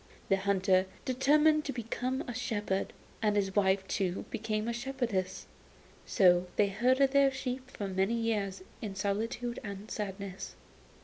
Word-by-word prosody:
The 195 - +4
hunter 190 -1 +2 0.2
determined 300 +4 +4
to 280 - -1
become 250 +2 -2
a 245 - -5
shepherd, 210 -5 -1 0.3
and 210 -2 +2
his 195 -2 0
wife 190 -1 +3
too 190 -2 -1
became 215 0 -2
a 235 - 0
shepherdess. 240 -6 -2 0.6
So 180 -2 +4
they 205 -1 +3
herded 255 +6 +3
their 280 0 +5
sheep 260 -1 -4
for 205 -5 -5
many 190 +4 +1
years 210 -5 -1 0.2
in 205 -3 -5
solitude 225 +5 -2
and 200 0 -7
sadness. 195 -2 -5
210 Hz, 140 wpm, -31 LUFS, 195-250 Hz, 0.6 s, their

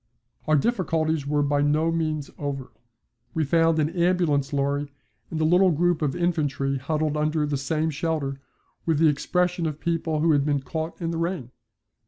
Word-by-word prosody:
Our 155 - +4
difficulties 160 - 0
were 145 0 +1
by 145 0 +1
no 155 +3 +2
means 155 -3 -2
over. 140 -3 -4 0.6
We 160 - +2
found 165 +2 +3
an 155 0 +1
ambulance 170 -5 +1
lorry 140 0 -1 0.4
and 160 - -4
a - - +1
little 180 +4 +5
group 175 +1 +1
of 145 -3 0
infantry 145 -6 0
huddled 155 +2 -1
under 155 0 +1
the 145 -1 -1
same 155 +4 -1
shelter 150 -3 -2 0.4
with 160 -3 +1
the 160 +1 +5
expression 175 +3 0
of 155 -1 -5
people 165 -2 -1
who 165 +1 +4
had 145 -2 +3
been 145 -1 0
caught 160 +5 -5
in 165 -2 -2
the 165 - -3
rain. 165 -8 -3
155 Hz, 175 wpm, -25 LUFS, 145-165 Hz, 0.6 s, little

